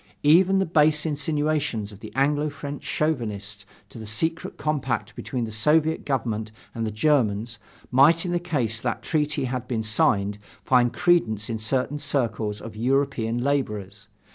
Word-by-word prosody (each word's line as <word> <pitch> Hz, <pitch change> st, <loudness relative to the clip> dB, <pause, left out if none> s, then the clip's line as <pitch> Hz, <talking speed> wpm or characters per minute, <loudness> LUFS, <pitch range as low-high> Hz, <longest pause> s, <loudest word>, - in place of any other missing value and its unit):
Even 180 Hz, +6 st, +5 dB
the 190 Hz, -, +2 dB
base 155 Hz, -2 st, +3 dB
insinuations 150 Hz, -7 st, -1 dB
of 100 Hz, -, -13 dB
the 110 Hz, -, -9 dB
Anglo 145 Hz, +2 st, +2 dB
French 145 Hz, 0 st, -7 dB
chauvinists 105 Hz, -9 st, -2 dB, 0.2 s
to 115 Hz, -, -11 dB
the 110 Hz, -, -8 dB
secret 160 Hz, +10 st, -2 dB
compact 125 Hz, -8 st, -2 dB
between 125 Hz, -2 st, -4 dB
the 110 Hz, -, -7 dB
Soviet 155 Hz, +8 st, +2 dB
Government 115 Hz, -5 st, -2 dB, 0.2 s
and 115 Hz, -1 st, -2 dB
the -, -, -3 dB
Germans, 115 Hz, -3 st, +1 dB, 0.3 s
might 155 Hz, +7 st, +5 dB
in 175 Hz, -1 st, 0 dB
case 130 Hz, -11 st, 0 dB
that 120 Hz, -1 st, -3 dB
treaty 150 Hz, -2 st, 0 dB
had 125 Hz, -1 st, -3 dB
been 115 Hz, -3 st, -2 dB
signed 105 Hz, -1 st, +1 dB, 0.3 s
find 125 Hz, -2 st, +4 dB
credence 120 Hz, -, +1 dB
in 110 Hz, -, -3 dB
certain 130 Hz, +6 st, -1 dB
circles 115 Hz, -7 st, -1 dB
of 115 Hz, -, -9 dB
European 125 Hz, -1 st, 0 dB
laborers. 105 Hz, -7 st, -2 dB
130 Hz, 150 wpm, -25 LUFS, 110-150 Hz, 0.3 s, Even